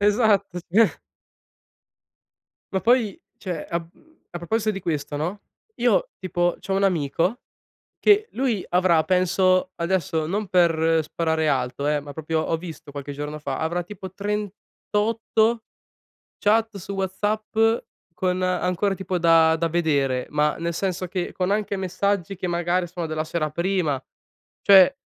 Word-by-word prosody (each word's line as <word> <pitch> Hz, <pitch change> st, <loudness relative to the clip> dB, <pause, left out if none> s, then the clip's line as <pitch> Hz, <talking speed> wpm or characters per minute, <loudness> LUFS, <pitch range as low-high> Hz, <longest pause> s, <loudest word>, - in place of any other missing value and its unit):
esatto, 205 Hz, -3 st, +2 dB
sì. 220 Hz, +5 st, +5 dB, 1.8 s
Ma 190 Hz, -, +2 dB
poi, 230 Hz, -3 st, +2 dB, 0.2 s
cioè, 175 Hz, -6 st, -5 dB
a 170 Hz, -, 0 dB
mhmm, 175 Hz, -, -17 dB
a 175 Hz, -, -6 dB
proposito 215 Hz, +6 st, 0 dB
di 195 Hz, -2 st, -4 dB
questo, 150 Hz, -4 st, -3 dB
no, 175 Hz, +7 st, -3 dB, 0.4 s
io -, -, +2 dB
tipo 175 Hz, -2 st, 0 dB
c'ho 195 Hz, -, -5 dB
un 195 Hz, +1 st, +2 dB
amico 175 Hz, -, 0 dB, 0.6 s
che 420 Hz, +1 st, +4 dB
lui 245 Hz, -7 st, -1 dB
avrà 175 Hz, -2 st, +4 dB
penso 185 Hz, 0 st, +2 dB
adesso 170 Hz, -2 st, -1 dB
non 205 Hz, +5 st, -2 dB
per 165 Hz, -2 st, +3 dB
sparare 160 Hz, 0 st, -1 dB
alto, 135 Hz, 0 st, -1 dB
eh, 150 Hz, 0 st, +1 dB
ma 145 Hz, 0 st, -10 dB
proprio 160 Hz, 0 st, -1 dB
ho 165 Hz, -, 0 dB
visto 160 Hz, -2 st, -9 dB
qualche 145 Hz, 0 st, -6 dB
giorno 145 Hz, +2 st, -5 dB
fa, 140 Hz, -3 st, -4 dB
avrà 170 Hz, +3 st, -1 dB
tipo 190 Hz, +1 st, -9 dB
38 210 Hz, +2 st, -1 dB, 0.7 s
chat 220 Hz, +1 st, +2 dB
su 200 Hz, 0 st, -7 dB
WhatsApp 205 Hz, +3 st, -2 dB, 0.6 s
con 185 Hz, +1 st, -1 dB
ancora 185 Hz, +2 st, 0 dB
tipo 190 Hz, -1 st, -3 dB
da 165 Hz, -1 st, +5 dB
da 165 Hz, +1 st, -1 dB
vedere, 140 Hz, -6 st, +1 dB
ma 150 Hz, 0 st, +1 dB
nel 170 Hz, 0 st, -2 dB
senso 185 Hz, +1 st, -2 dB
che 180 Hz, 0 st, -3 dB
con 185 Hz, 0 st, -2 dB
anche 205 Hz, 0 st, 0 dB
messaggi 195 Hz, 0 st, -1 dB
che 180 Hz, 0 st, -4 dB
magari 175 Hz, +1 st, 0 dB
sono 175 Hz, 0 st, -5 dB
della 155 Hz, -1 st, -2 dB
sera 155 Hz, -1 st, -2 dB
prima. 170 Hz, -5 st, 0 dB, 0.6 s
Cioè, 200 Hz, +7 st, +7 dB
180 Hz, 145 wpm, -24 LUFS, 160-200 Hz, 1.8 s, Cioè